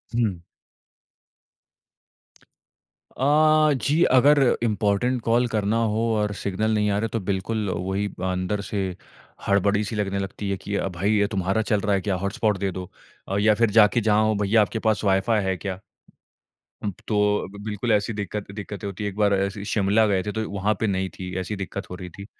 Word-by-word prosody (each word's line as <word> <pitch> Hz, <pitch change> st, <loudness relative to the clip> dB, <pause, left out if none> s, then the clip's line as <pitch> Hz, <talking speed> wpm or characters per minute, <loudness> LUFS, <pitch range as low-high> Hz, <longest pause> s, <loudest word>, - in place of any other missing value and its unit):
हुँ। 105 Hz, -7 st, 0 dB, 2.8 s
अ, 130 Hz, -, -2 dB, 0.5 s
जी, 145 Hz, +7 st, +1 dB
अगर 145 Hz, +3 st, +6 dB, 0.2 s
important 110 Hz, +3 st, +1 dB
call 120 Hz, +2 st, +2 dB
करना 110 Hz, -1 st, 0 dB, 0.2 s
हो 115 Hz, +2 st, 0 dB
और 105 Hz, -1 st, 0 dB
सिग्नल 105 Hz, +3 st, -1 dB
नहीं 105 Hz, -1 st, +1 dB
आ 100 Hz, -, +1 dB
रहे, 115 Hz, 0 st, -1 dB
तो 115 Hz, -, -2 dB
बिल्कुल 100 Hz, +2 st, -2 dB
वही 95 Hz, +3 st, -2 dB, 0.2 s
अंदर 90 Hz, +3 st, -2 dB
से 100 Hz, -2 st, -1 dB, 0.6 s
हड़बड़ी-सी 100 Hz, +2 st, +1 dB
लगने 100 Hz, -1 st, -1 dB
लगती 100 Hz, +1 st, -4 dB
है 95 Hz, -, -1 dB
कि 100 Hz, +1 st, -5 dB
अ, 100 Hz, -, 0 dB
"भई, 95 Hz, +3 st, -1 dB
ये 100 Hz, -, +2 dB
तुम्हारा 95 Hz, +1 st, 0 dB
चल 105 Hz, -1 st, +1 dB
रहा 100 Hz, 0 st, +1 dB
है 95 Hz, -, 0 dB
क्या? 100 Hz, -1 st, -1 dB
हॉटस्पॉट 100 Hz, +1 st, 0 dB
दे 95 Hz, 0 st, -1 dB
दो।" 90 Hz, 0 st, -7 dB, 0.4 s
अ, 100 Hz, -, -1 dB
या 105 Hz, +1 st, +4 dB
फिर 115 Hz, -, +5 dB
जाके 105 Hz, +3 st, +5 dB
जहाँ 110 Hz, 0 st, +3 dB
हो, 110 Hz, -1 st, +1 dB
"भईया, 105 Hz, +2 st, +4 dB
आपके 110 Hz, +2 st, -1 dB
पास 110 Hz, -1 st, +1 dB
वाई-फ़ाई 100 Hz, +3 st, +2 dB
है 95 Hz, 0 st, 0 dB
क्या?" 95 Hz, 0 st, -5 dB, 1.0 s
उम, 105 Hz, -, -1 dB
प 90 Hz, -, -21 dB
तो 105 Hz, -, 0 dB, 0.3 s
अब -, -, -9 dB
बिल्कुल, 110 Hz, +2 st, -2 dB
ऐसी 105 Hz, +1 st, +1 dB
दिक्कत 105 Hz, 0 st, -5 dB
दिक्कतें 105 Hz, 0 st, -7 dB
होती 100 Hz, +1 st, -6 dB
हैं। 105 Hz, -, -1 dB
एक 100 Hz, -, -15 dB
बार 105 Hz, -1 st, +3 dB
ऐसे 100 Hz, +1 st, -1 dB
ही 100 Hz, -, -6 dB
शिमला 105 Hz, +1 st, +2 dB
गए 95 Hz, -2 st, +1 dB
थे, 105 Hz, -, -3 dB
तो 110 Hz, 0 st, -3 dB
वहाँ 100 Hz, +2 st, 0 dB
पे 110 Hz, -, 0 dB
नहीं 95 Hz, -1 st, -1 dB
थी, 90 Hz, -1 st, -8 dB
ऐसी 100 Hz, +3 st, -4 dB
दिक्कत 95 Hz, 0 st, -6 dB
हो 90 Hz, -, -6 dB
रही 90 Hz, 0 st, -8 dB
थी। 100 Hz, -, -8 dB
100 Hz, 195 wpm, -24 LUFS, 95-110 Hz, 2.8 s, अगर